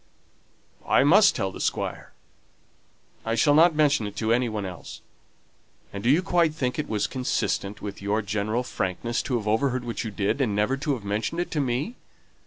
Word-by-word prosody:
"I - - +4
must 190 +9 +6
tell 95 -5 -1
the - - -8
Squire. - - -3 1.1
I 115 0 -1
shall 145 +5 +4
not 165 +2 +5
mention 145 -8 +2
it 100 - -9
to 110 +1 +1
any 120 0 +1
one 105 -2 -3
else. 90 -1 -9 0.9
And 100 0 -6
do 120 - +2
you 160 +7 +4
quite 170 -4 +2
think 130 -2 -2
it 150 - -3
was 105 -2 0
consistent 115 -5 -2
with 100 -1 -6
your 105 +2 0
general 105 +4 -1
frankness 115 +1 -2
to 125 - -1
have 105 -2 -5
overheard 125 +4 +1
what 120 0 -4
you 115 - -4
did, 105 +6 -1
and 110 -6 0
never 105 +6 +1
to 140 +1 -1
have 110 -5 -10
mentioned 105 +11 -2
it 175 - -2
to 155 - -1
me? 140 - -2
120 Hz, 195 wpm, -25 LUFS, 105-145 Hz, 1.1 s, must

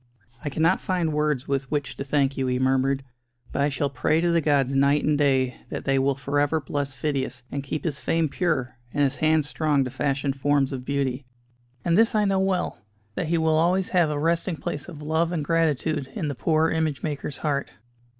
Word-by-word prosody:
"I 145 - -2
cannot 160 +6 +2
find 175 -4 0
words 150 -3 0
with 135 -1 -1
which 145 -3 -2
to - - -3
thank 140 -1 +1
you," 135 -1 -1
he 125 0 +1
murmured, 135 +1 +1 0.5
"but - - -1
I 145 - +3
shall 140 0 -1
pray 140 +4 +1
to 170 0 +2
the 170 -1 +3
gods 140 -3 +2
night 140 +2 +3
and 150 - +2
day 135 -3 +2
that - - -5
they 135 -1 +2
will 135 +1 +2
for 140 +1 -1
ever 145 +2 +2
bless 140 -1 -3
Phidias, 130 -3 -2
and 140 -1 -3
keep 145 +2 -4
his 150 -5 -2
fame 165 -1 +1
pure, 135 -6 -1 0.2
and 145 - +3
his 135 0 +1
hands 155 -1 +2
strong 150 -2 +1
to 125 - -4
fashion 140 +1 -1
forms 140 0 +1
of 125 -1 -5
beauty. 135 -2 -2 0.6
And 170 -1 +3
this 225 +2 +4
I 210 -1 +3
know 195 -1 +2
well: 190 -1 0 0.3
that 160 - -2
he 170 +1 +1
will 160 -1 +2
always 180 +3 +2
have 175 -4 +3
a 150 - -2
resting 165 +3 0
place 145 +1 -5
of 150 -3 -9
love 160 +2 +1
and 160 -5 -2
gratitude 155 -3 +1
in 170 -9 -2
the - - -2
poor 160 +4 +1
image 160 -3 -1
maker's 145 -2 -3
heart." 140 -2 0
145 Hz, 215 wpm, -25 LUFS, 135-160 Hz, 0.6 s, this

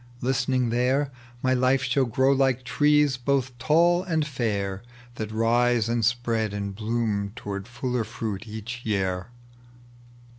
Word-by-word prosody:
Listening 130 -1 0
tliere, 130 +4 +1 0.3
My 130 0 +3
life 130 +1 +2
shall 140 -1 +2
grow 130 +3 +2
like 135 -2 +2
trees 150 0 +3
both 130 0 0
tall 170 +5 +4
and 160 -5 0
fair 100 -8 -2 0.3
That 110 -2 -5
rise 115 +1 +2
and 115 0 0
spread 115 -2 0
and 100 -1 -3
bloom 105 -1 -1
toward 100 -2 -5 0.2
MIer 125 -2 0
fruit 110 -2 -5
each 110 +3 -6
year." 95 -3 -1
120 Hz, 135 wpm, -25 LUFS, 110-130 Hz, 0.3 s, tall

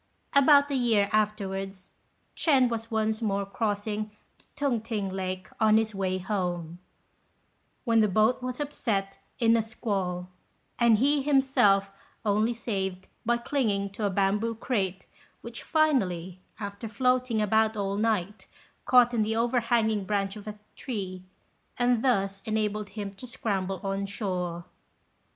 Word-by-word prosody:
About 285 0 +6
a - - +1
year 225 -6 +2
afterwards, 195 -3 -2 0.4
Ch'ên 265 -6 +3
was 225 -1 -4
once 220 0 0
more 200 -2 0
crossing 210 +1 -2 0.3
the - - -23
Tung 275 -6 0
t'ing 215 -3 -3
lake 185 -1 -4
on 220 -1 +5
his 220 -1 0
way 190 -1 -1
home, 180 -3 -3 1.1
when 230 -2 +4
the 215 - +5
boat 215 +6 +2
was 255 +1 -4
upset 220 -9 -2 0.2
in 230 -2 +4
a 230 - +3
squall, 195 -5 -3 0.5
and 235 -2 +5
he 285 +5 +3
himself 265 -9 +3 0.3
only 215 +2 +2
saved 190 -5 -4 0.2
by 240 0 +3
clinging 215 -7 -1
to 205 +2 -6
a 205 - +2
bamboo 205 +4 +1
crate, 195 -6 -2 0.4
which 235 0 -8
finally, 190 - +1 0.2
after 200 +1 -5
floating 250 +1 +1
about 220 +1 +2
all 200 -1 -1
night, 210 -2 -1 0.4
caught 245 -1 +5
in 230 - +2
the 220 +1 0
overhanging 230 -3 +1
branch 195 0 -1
of 210 0 -10
a 210 0 -6 0.2
tree, 190 -7 -5 0.6
and 245 -2 +2
thus 195 -6 +1
enabled 215 -2 -1
him 200 -1 -6
to 250 +6 -10
scramble 195 -5 -2
on 195 0 -2
shore. 180 -4 -3
215 Hz, 140 wpm, -28 LUFS, 195-235 Hz, 1.1 s, About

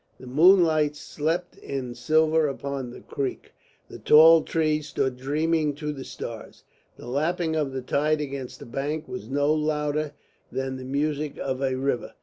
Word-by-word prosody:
The 130 - -11
moonlight 155 +1 +4
slept 160 +4 -3
in 130 -3 -5
silver 155 +5 +2
upon 140 -2 -4
the 120 - -11
creek; 135 -2 -5 0.3
the - - -10
tall 160 +2 +7
trees 155 -2 0
stood 130 -3 -1
dreaming 150 +3 0
to 150 0 -4
the 135 -2 -7
stars; 115 -3 -8 0.3
the - - -11
lapping 160 +5 0
of 150 -3 0
the 130 -1 -5
tide 150 +4 +1
against 135 -3 -5
the - - -9
bank 145 +6 -3
was 190 0 -7
no 145 +2 +2
louder 150 -1 -1 0.4
than 130 0 -3
the 130 - -8
music 145 +2 -2
of 130 -1 -3
a 130 -1 0
river. 130 -1 -2
150 Hz, 160 wpm, -25 LUFS, 135-155 Hz, 0.4 s, tall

